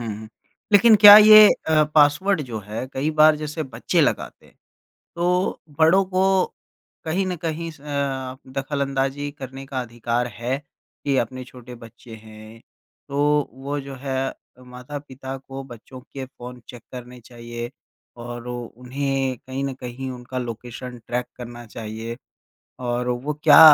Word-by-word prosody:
हुँ। 110 Hz, -2 st, -6 dB, 0.4 s
लेकिन 215 Hz, +2 st, +7 dB
क्या 205 Hz, 0 st, +11 dB
ये 215 Hz, 0 st, +10 dB, 0.2 s
अ, 155 Hz, -1 st, +4 dB
पासवर्ड 155 Hz, +5 st, +4 dB
जो 120 Hz, -5 st, -6 dB
है, 105 Hz, +5 st, -6 dB
कई 145 Hz, +4 st, -1 dB
बार 155 Hz, 0 st, +5 dB
जैसे 155 Hz, +1 st, -4 dB
बच्चे 120 Hz, -4 st, -1 dB
लगाते -, -, -1 dB
हैं, -, -, -23 dB, 0.6 s
तो 180 Hz, +2 st, 0 dB, 0.2 s
बड़ों 170 Hz, +5 st, +5 dB
को 185 Hz, 0 st, 0 dB, 0.8 s
कहीं 180 Hz, +4 st, 0 dB
न 180 Hz, -1 st, -2 dB
कहीं 165 Hz, +1 st, -4 dB
स 155 Hz, -, -16 dB
अ, 140 Hz, -3 st, -3 dB, 0.2 s
दखलअंदाज़ी 140 Hz, 0 st, -2 dB
करने 135 Hz, -1 st, -9 dB
का 135 Hz, -1 st, -3 dB
अधिकार 120 Hz, 0 st, -2 dB
है, 125 Hz, +3 st, -1 dB, 0.5 s
कि 140 Hz, -2 st, +1 dB
अपने 130 Hz, +2 st, -9 dB
छोटे 125 Hz, 0 st, -12 dB
बच्चे 115 Hz, 0 st, -13 dB
हैं, 110 Hz, +1 st, -13 dB, 0.5 s
तो 145 Hz, +1 st, +1 dB
वो 140 Hz, +3 st, -4 dB
जो 135 Hz, 0 st, -8 dB
है 135 Hz, -1 st, -2 dB, 0.3 s
माता-पिता 130 Hz, +1 st, -8 dB
को 135 Hz, 0 st, -9 dB
बच्चों 125 Hz, +3 st, -12 dB
के 135 Hz, 0 st, -8 dB
फ़ोन 125 Hz, -1 st, -11 dB
चेक 120 Hz, -3 st, -11 dB
करने 125 Hz, 0 st, -9 dB
चाहिए 120 Hz, 0 st, -8 dB, 0.5 s
और 120 Hz, 0 st, -7 dB
उन्हें 130 Hz, +2 st, -3 dB
कहीं 130 Hz, +1 st, -3 dB
न 135 Hz, -1 st, -3 dB
कहीं 130 Hz, +1 st, -6 dB
उनका 125 Hz, +1 st, -6 dB
लोकेशन 120 Hz, +1 st, -7 dB
ट्रैक 125 Hz, 0 st, -2 dB
करना 120 Hz, -1 st, -9 dB
चाहिए। 110 Hz, +1 st, -7 dB, 0.7 s
और 120 Hz, 0 st, -1 dB
वो 125 Hz, +5 st, -2 dB
क्या -, -, +9 dB
130 Hz, 145 wpm, -23 LUFS, 120-145 Hz, 0.8 s, क्या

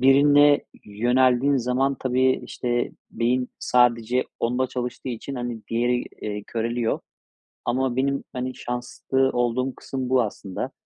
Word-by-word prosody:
birine 145 Hz, +2 st, +6 dB, 0.2 s
yöneldiğin 125 Hz, +5 st, +3 dB
zaman 130 Hz, +2 st, +1 dB
tabii, 130 Hz, 0 st, +2 dB
işte, 120 Hz, 0 st, -1 dB, 0.2 s
beyin 125 Hz, +2 st, 0 dB
sadece 125 Hz, 0 st, +2 dB, 0.2 s
onda 125 Hz, +2 st, +1 dB
çalıştığı 125 Hz, 0 st, -4 dB
için, 125 Hz, +3 st, -5 dB
hani, 120 Hz, -2 st, -4 dB
diğeri, 120 Hz, +1 st, +1 dB, 0.2 s
eee, 105 Hz, -1 st, -3 dB
köreliyor 115 Hz, 0 st, -1 dB, 0.7 s
ama 125 Hz, 0 st, 0 dB
benim, 140 Hz, +1 st, 0 dB
hani, 125 Hz, 0 st, -3 dB
şanslı 125 Hz, +2 st, -1 dB
olduğum 120 Hz, +2 st, 0 dB
kısım 130 Hz, -2 st, -5 dB
bu 130 Hz, -1 st, +4 dB
aslında. 100 Hz, -3 st, -4 dB
125 Hz, 120 wpm, -24 LUFS, 120-130 Hz, 0.7 s, birine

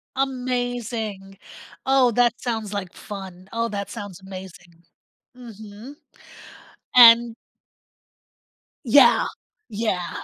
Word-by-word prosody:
Amazing. 245 Hz, -6 st, -3 dB, 0.5 s
Oh, 265 Hz, -2 st, +3 dB
that 240 Hz, +1 st, +1 dB
sounds 220 Hz, -4 st, -4 dB
like 190 Hz, -3 st, -5 dB
fun. 190 Hz, -2 st, -10 dB
Oh, 230 Hz, 0 st, -1 dB
that 200 Hz, -2 st, -5 dB
sounds 205 Hz, -5 st, -8 dB
amazing. 185 Hz, -3 st, -12 dB, 0.5 s
Mhm, 220 Hz, +2 st, -12 dB, 1.0 s
and 235 Hz, -1 st, +8 dB, 1.5 s
Yeah, -, -, +5 dB, 0.4 s
yeah. 200 Hz, -5 st, -3 dB
220 Hz, 80 wpm, -22 LUFS, 195-245 Hz, 1.5 s, and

